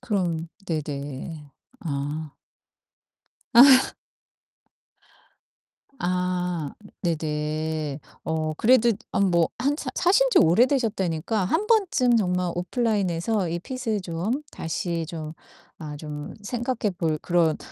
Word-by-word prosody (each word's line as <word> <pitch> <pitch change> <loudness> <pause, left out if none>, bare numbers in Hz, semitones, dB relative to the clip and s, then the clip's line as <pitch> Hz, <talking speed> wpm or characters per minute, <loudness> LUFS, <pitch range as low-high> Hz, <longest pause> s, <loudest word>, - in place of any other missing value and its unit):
그럼 170 -6 -1 0.2
네네. 145 -1 -5 0.3
아. 150 0 -4 1.2
아. 260 +2 +8 2.0
아 180 -3 -1 0.3
네네. 155 -2 -2 0.3
어 155 -1 -1
그래도 240 0 +5 0.2
아 - - 0
뭐 175 -4 +3
한 280 +4 +1
사 - - -4
사신지 485 +8 +4
오래되셨다니까 205 - +2
한 380 - 0
번쯤 330 - +3
정말 180 -3 0
오프라인에서 195 -1 0
이 170 +1 -2
핏을 225 -2 -3
좀 185 - -2
다시 165 0 -3
좀 160 -3 -6 0.4
아 150 -2 -7
좀 150 -1 -7
생각해 240 0 -2
볼 160 -4 0
그런 170 -3 +2
175 Hz, 180 characters per minute, -25 LUFS, 155-225 Hz, 2.0 s, 아